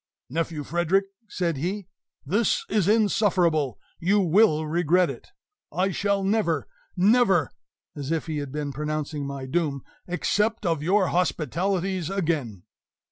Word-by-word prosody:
"Nephew 160 0 -2
Frederick," 175 +5 +1 0.2
said 170 -5 -1
he, 190 +7 -3 0.4
"this 200 +9 +1
is 205 -4 +1
insufferable; 185 - +2 0.2
you 195 +4 +3
will 175 -3 +4
regret 175 +1 +2
it! 125 - -11 0.4
I 190 +2 0
shall 200 +1 0
never 195 -6 +1 0.3
NEVER" 195 -3 +4 0.4
(as 145 0 -5
if 165 -1 -1
he 160 -2 -3
had 145 -2 -5
been 145 -1 -3
pronouncing 150 0 -3
my 140 -1 -5
doom) 140 -2 -1 0.2
"accept 210 +5 0
of 165 -4 +1
your 190 +4 +2
hospitalities 180 +2 0
again!" 155 - -2
175 Hz, 130 wpm, -25 LUFS, 150-195 Hz, 0.4 s, will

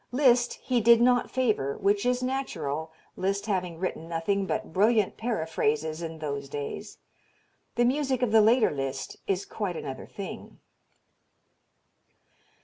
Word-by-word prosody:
Liszt 245 -2 +3
he 250 -2 +1
did 235 +1 +7
not 245 0 +3
favor, 215 - 0
which 200 +3 +1
is 250 0 +1
natural, 160 - -3 0.2
Liszt 195 +1 -1
having 180 -5 -2
written 165 -2 -4
nothing 190 +4 0
but 215 -5 -3
brilliant 215 +2 +3
paraphrases 160 -7 -1
in 165 -1 -5
those 140 -3 -4
days. 145 0 -6 0.8
The 240 - +3
music 265 -1 +1
of 235 - +1
the 220 0 +7
later 225 +3 +4
Liszt 135 -2 -4
is 195 0 0
quite 200 -5 -3
another 135 - -6
thing. 200 - -8
200 Hz, 135 wpm, -27 LUFS, 160-240 Hz, 0.8 s, did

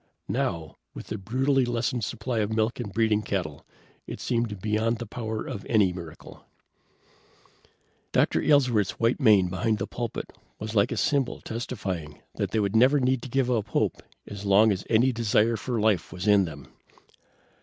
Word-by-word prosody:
Now, 80 -3 -2 0.2
with - - -9
the - - -4
brutally 130 +7 +1
lessened 120 0 -1
supply 115 +2 -3
of 105 0 -1
milk 110 +2 0
and 110 -5 -4
breeding 110 0 +2
cattle, 90 -9 -3 0.4
it - - -6
seemed 115 -5 -1
beyond 110 +3 0
the 120 - -6
power 110 0 -5
of 100 - -6
any 100 -5 +3
miracle. 85 -3 -10 1.7
Dr. - - +2
Aylesworth's 125 -9 +2
white 115 +4 +2
mane 105 -8 +5
behind 95 +5 0
the 100 - -2
pulpit 120 -2 -5 0.2
was 110 +1 -6
like 105 +1 +3
a - - -2
symbol 140 -3 0
testifying 95 -10 -5 0.2
that - - -1
they 110 - 0
never 115 +8 +4
need 130 0 0
give 130 0 +1
up 115 -3 0
hope - - -1 0.2
as 100 -1 -8
long 105 +2 +5
as 95 -1 -2
any 120 +4 +4
desire 115 -1 +2
for 120 0 -3
life 105 -5 +1
was 90 +5 -5
in 100 -2 +5
them. 75 -4 -9
110 Hz, 165 wpm, -26 LUFS, 100-120 Hz, 1.7 s, mane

